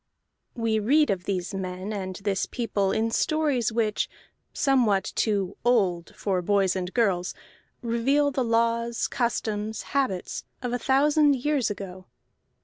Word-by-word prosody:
We 225 -2 +1
read 290 +7 +3
of 185 -2 -3
these 190 0 -2
men 185 +2 -4
and 190 -2 -4
this 200 0 -1
people 205 -5 -1
in 225 +1 0
stories 290 -6 +1
which, 220 -2 0 0.4
somewhat 240 -8 +2
too 200 -3 0
"old" 195 -8 +1
for 190 -3 -1
boys 195 0 +2
and 185 -1 -3
girls, 190 -7 +1 0.5
reveal 270 +5 +2
the 265 -1 0
laws, 230 0 +1
customs, 220 -3 -2
habits 260 -10 -1 0.2
of 245 -1 -2
a 245 - 0
thousand 290 +2 +4
years 270 -1 0
ago. 185 -2 -7
220 Hz, 135 wpm, -26 LUFS, 195-245 Hz, 0.5 s, thousand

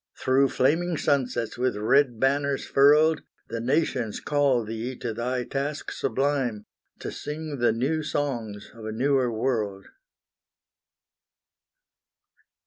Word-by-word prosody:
Through 135 +1 +3
flaming 165 +7 +1
sunsets 125 -5 0
with 125 -3 +1
red 120 +2 +2
banners 140 +1 +1
furled, 150 +3 +5 0.3
The 115 +1 -3
nations 125 -3 0
call 140 -5 +2
thee 115 +4 -4
to 120 -2 -4
thy 125 +2 -2
task 140 +4 -3
sublime, 135 -6 -1 0.4
To - - -4
sing 150 -1 -6
the 120 - +3
new 135 +8 0
songs 120 -9 -3
of 115 - -12
a 110 - -3
newer 130 +2 +1
world! 110 -5 -2
130 Hz, 115 wpm, -26 LUFS, 115-145 Hz, 0.4 s, furled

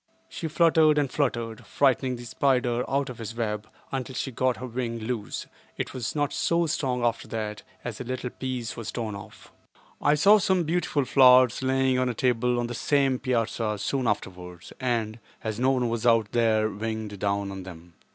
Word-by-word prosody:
She 165 - -5
fluttered 160 -1 +4
and 140 -3 +1
fluttered, 120 -6 -1
frightening 130 -2 +1
the 120 0 -9
spider 125 -1 +1
out 140 -1 0
of 120 - -11
his 115 0 -6
web, 105 -3 -3 0.2
until 130 -1 -4
she 135 - -2
got 130 +1 0
her 130 - -6
wing 120 -1 -3
loose; 110 -1 -4 0.3
but - - -1
it - - -12
was 125 +1 -4
not 145 -1 0
so 170 0 +1
strong 130 -5 -1
after 115 - -1
that, 105 -2 -4 0.2
as 120 -1 -5
a - - -3
little 125 0 -4
piece 125 -4 -4
was 115 -2 -5
torn 115 -3 -3
off. 100 -1 -11 0.5
I 145 - +4
saw 200 +8 +6
some 185 -1 +2
beautiful 160 -3 0
flowers 125 -3 +6
lying 130 0 +2
on 130 0 +1
a 120 - -3
table 125 0 +1
on 120 - 0
the 120 - -5
same 135 0 +1
piazza 115 -3 -1
soon 125 +5 -1
afterwards 90 -4 -4
and, 115 -3 -1 0.2
as 110 0 -3
no 130 +1 +3
one 125 -2 +1
was 115 -1 -2
out 115 -3 +3
there, 110 -2 +2
winged 110 -1 -4
down 100 0 -1
on 95 -1 -6
them. 85 -2 -11
120 Hz, 190 wpm, -26 LUFS, 110-130 Hz, 0.5 s, saw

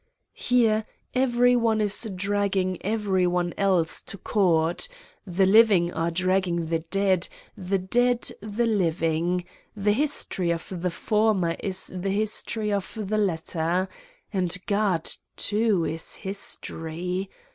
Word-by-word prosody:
Here 225 -3 +2 0.3
every 245 -1 +3
one 230 -2 +2
is 210 +2 0
dragging 195 -1 0
every 200 -3 +1
one 175 0 0
else 185 -5 +1
to 200 - -7
court: 175 - +1 0.4
the 185 +1 +2
living 195 -4 +5
are 165 +1 0
dragging 180 -1 +1
the 165 -1 +1
dead, 185 +1 +1 0.3
the 195 -1 -1
dead 240 +6 +1
the 215 +3 -1
living. 175 -3 0 0.3
The 205 0 +1
history 250 - -1
of 170 +1 -3
the 180 - +1
former 200 -2 +1
is 190 -1 -1
the 185 +2 -2
history 215 +1 0
of 200 +2 -3
the 215 +1 -1
latter. 175 -1 0 0.5
And 180 -3 0
God, 200 -6 +1 0.3
too, 210 -5 +1
is 160 +1 -4
History 180 -1 -4
190 Hz, 125 wpm, -25 LUFS, 175-215 Hz, 0.5 s, living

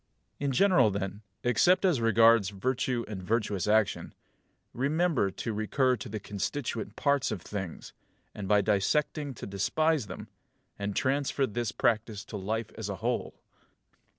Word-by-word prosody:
In 140 -1 0
general 155 - +4
then, 100 +1 -4 0.2
except 175 - +4
as 165 -10 +2
regards 115 -2 +5
virtue 120 +3 -1
and 100 -3 -6
virtuous 105 -1 -1
action, 110 -1 +1 0.6
remember 145 - +1
to 110 +4 -4
recur 125 +5 +1
to 110 - -8
the 110 +1 -4
constituent 105 +2 -4
parts 140 -2 +1
of 100 -5 -4
things, 95 -5 -6 0.4
and 100 -2 -6
by 105 +1 +4
dissecting 135 +8 0
to - - -7
despise 135 - 0
them; 95 - -8 0.5
and 100 0 -3
transfer 140 +1 +1
this 120 -1 -3
practice 110 -3 0
to - - -8
life 110 +3 -3
as 110 -2 -5
a 100 - -3
whole. 120 +6 -2
115 Hz, 145 wpm, -29 LUFS, 100-130 Hz, 0.6 s, regards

